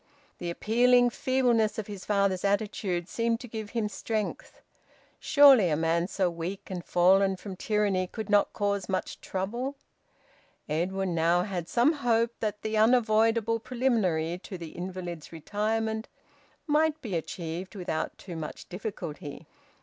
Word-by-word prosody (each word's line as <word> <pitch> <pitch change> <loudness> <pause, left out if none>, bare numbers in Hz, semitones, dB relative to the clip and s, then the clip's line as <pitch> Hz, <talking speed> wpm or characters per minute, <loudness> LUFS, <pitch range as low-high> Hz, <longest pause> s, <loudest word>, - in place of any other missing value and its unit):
The 175 - -3
appealing 245 +6 +4
feebleness 245 -5 +1
of 220 - -3
his 200 -2 -8
father's 200 -3 +1
attitude 200 -3 -1
seemed 230 +2 0
to 245 - -8
give 220 -2 -6
him 225 -2 -1
strength. 215 0 -4 0.6
Surely 275 - +7
a 150 - +2
man 165 +2 +1
so 190 -1 0
weak 175 +4 -5
and 180 -2 -4
fallen 190 +3 +4
from 190 +1 -8
tyranny 200 -2 0
could 220 +2 -6
not 205 -1 +3
cause 200 -2 -1
much 190 - -3
trouble! 235 +9 -3 0.9
Edwin 185 +4 -1
now 170 +2 +3
had 180 -4 -4
some 250 +6 +4
hope 235 -5 +1
that 210 -2 -3
the 220 0 -2
unavoidable 225 0 +3
preliminary 205 -10 0
to 190 0 -8
the 165 -2 -7
invalid's 175 -3 -6
retirement 220 +6 -2 0.6
might 310 0 +2
be 205 -7 -3
achieved 170 +3 -5
without 175 -4 -3
too 180 -3 -8
much 160 -2 -7
difficulty. 175 -6 -6
200 Hz, 140 wpm, -28 LUFS, 180-225 Hz, 0.9 s, Surely